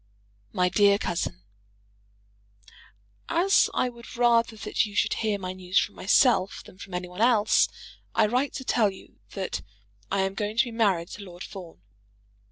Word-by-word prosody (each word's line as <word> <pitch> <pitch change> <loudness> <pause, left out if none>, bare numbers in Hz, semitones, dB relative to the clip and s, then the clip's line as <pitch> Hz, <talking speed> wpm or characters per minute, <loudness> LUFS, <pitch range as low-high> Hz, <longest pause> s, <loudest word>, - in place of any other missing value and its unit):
MY 180 +7 +1
DEAR 200 +2 +4
COUSIN, 90 - -3 1.9
As 380 +4 +3
I - - 0
would 235 0 -10
rather 235 -2 +3
that - - 0
you 205 -1 -6
should - - +2
hear 215 -2 -1
my 185 -1 -5
news 185 0 -3
from - - +2
myself 200 -1 +2
than 185 - -16
from 195 -3 -8
any 180 0 -3
one 180 +3 -7
else, 225 -3 +4 0.5
I - - +4
write 250 +6 0
to 265 - -5
tell 225 -5 +2
you 190 - -14 0.2
that 195 -2 -3 0.5
I 195 0 +1
am 190 0 -1
going 210 +2 -4
to - - +6
be 240 - -7
married 195 -7 +1
to 205 - -9
Lord 180 -1 -10
Fawn. 175 - -11
200 Hz, 170 wpm, -26 LUFS, 185-230 Hz, 1.9 s, to